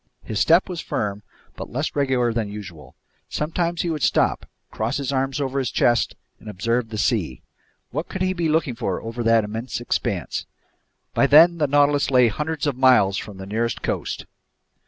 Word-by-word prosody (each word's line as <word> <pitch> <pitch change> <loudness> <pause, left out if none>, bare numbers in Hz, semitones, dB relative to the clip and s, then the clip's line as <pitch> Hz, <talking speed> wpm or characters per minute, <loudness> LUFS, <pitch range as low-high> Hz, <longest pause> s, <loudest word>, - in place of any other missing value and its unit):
His 110 - -3
step 170 - +4
was 175 -4 -5
firm 100 -1 -3 0.3
but - - -7
less 145 +6 -3
regular 130 -4 +1
than 110 -3 -2
usual. 90 -10 -10 0.3
Sometimes 170 +2 -1
he 170 - -1
would 155 -2 -3
stop, - - +1 0.2
cross 110 +2 -2
his 140 -1 -2
arms 135 +1 -1
over 135 -1 -1
his 130 -3 -1
chest, 120 0 +2 0.2
and 110 - -10
observe 115 +4 -1
the 110 - -5
sea. 100 - -1 0.5
What 155 +6 -4
could 190 - -3
he 185 0 +1
be 170 -3 -1
looking 155 -4 +1
for 95 -5 -2
over 115 +2 -6
that 115 -1 +4
immense 110 +5 -4
expanse? 120 - -2 0.7
By 140 - +3
then 165 +4 +7
the 150 - +2
Nautilus 145 0 +3
lay 125 -3 +5
hundreds 150 +5 -3
of 145 -3 0
miles 125 -7 +4
from 105 -3 -9
the 95 - -8
nearest 115 +4 -2
coast! - - -3
125 Hz, 180 wpm, -23 LUFS, 110-150 Hz, 0.7 s, then